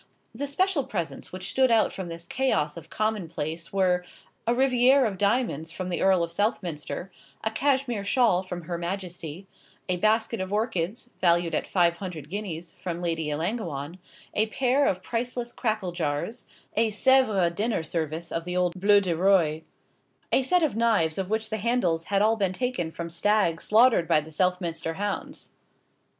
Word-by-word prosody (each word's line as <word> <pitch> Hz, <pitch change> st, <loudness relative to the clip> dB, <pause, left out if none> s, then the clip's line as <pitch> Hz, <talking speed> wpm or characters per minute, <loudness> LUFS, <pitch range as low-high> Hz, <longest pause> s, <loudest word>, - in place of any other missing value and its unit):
The 280 Hz, +6 st, -4 dB
special 355 Hz, +1 st, +1 dB
presents 170 Hz, -9 st, -5 dB
which 185 Hz, +1 st, -5 dB
stood 260 Hz, -1 st, +3 dB
out 225 Hz, -2 st, +3 dB
from 190 Hz, -2 st, -5 dB
this 170 Hz, 0 st, -7 dB
chaos 170 Hz, -, 0 dB
of 170 Hz, -, -10 dB
common 215 Hz, -5 st, -1 dB
place 160 Hz, +1 st, -5 dB
were 185 Hz, -2 st, +2 dB, 0.4 s
a -, -, +4 dB
rivière 255 Hz, +1 st, +4 dB
of 195 Hz, -4 st, -5 dB
diamonds 200 Hz, -, 0 dB
from 185 Hz, +1 st, -5 dB
the 175 Hz, -, -2 dB
Earl 190 Hz, -2 st, +4 dB
of 165 Hz, -, -4 dB
Southminster, 180 Hz, -3 st, -2 dB, 0.3 s
a 220 Hz, -, 0 dB
cashmere 260 Hz, -3 st, 0 dB
shawl 210 Hz, -4 st, +3 dB
from 180 Hz, -2 st, -6 dB
Her 170 Hz, +1 st, -4 dB
Majesty, 175 Hz, -1 st, -5 dB, 0.4 s
a 180 Hz, -1 st, 0 dB
basket 220 Hz, +2 st, +1 dB
of 190 Hz, +1 st, -4 dB
orchids, 215 Hz, +1 st, -2 dB
valued 175 Hz, -1 st, +3 dB
at -, -, -1 dB
five 170 Hz, -2 st, +2 dB
hundred 170 Hz, -6 st, -7 dB
guineas, 175 Hz, -5 st, -5 dB
from 175 Hz, -2 st, -3 dB
Lady 165 Hz, -3 st, -1 dB
Ellangowan, 165 Hz, -, -3 dB, 0.3 s
a 215 Hz, +1 st, +2 dB
pair 260 Hz, +4 st, +2 dB
of 185 Hz, 0 st, -1 dB
priceless 240 Hz, +2 st, -3 dB
crackle 215 Hz, -6 st, -1 dB
jars, 170 Hz, +7 st, -3 dB, 0.3 s
a 225 Hz, +1 st, +3 dB
Sèvres 215 Hz, -6 st, +3 dB
dinner 210 Hz, -1 st, -1 dB
service 160 Hz, +1 st, -3 dB
of 165 Hz, -, -2 dB
the 180 Hz, +1 st, -3 dB
old 180 Hz, -1 st, +2 dB
bleu 205 Hz, 0 st, +6 dB
du 180 Hz, -4 st, -1 dB
roi, 170 Hz, -4 st, +3 dB, 0.7 s
a -, -, +5 dB
set 350 Hz, +7 st, +3 dB
of 300 Hz, -, +1 dB
knives 210 Hz, -8 st, +2 dB
of 190 Hz, -1 st, -3 dB
which 220 Hz, 0 st, -1 dB
the 220 Hz, -, 0 dB
handles 190 Hz, -8 st, +1 dB
had 200 Hz, 0 st, +2 dB
all 225 Hz, +1 st, +3 dB
been 195 Hz, -3 st, 0 dB
taken 215 Hz, -8 st, -2 dB
from 170 Hz, +1 st, -5 dB
stags 170 Hz, 0 st, +1 dB
slaughtered 225 Hz, -5 st, +5 dB
by -, -, +4 dB
the 155 Hz, +1 st, -9 dB
Southminster 170 Hz, -1 st, -1 dB
hounds. 205 Hz, +2 st, -4 dB
190 Hz, 170 wpm, -26 LUFS, 170-225 Hz, 0.7 s, bleu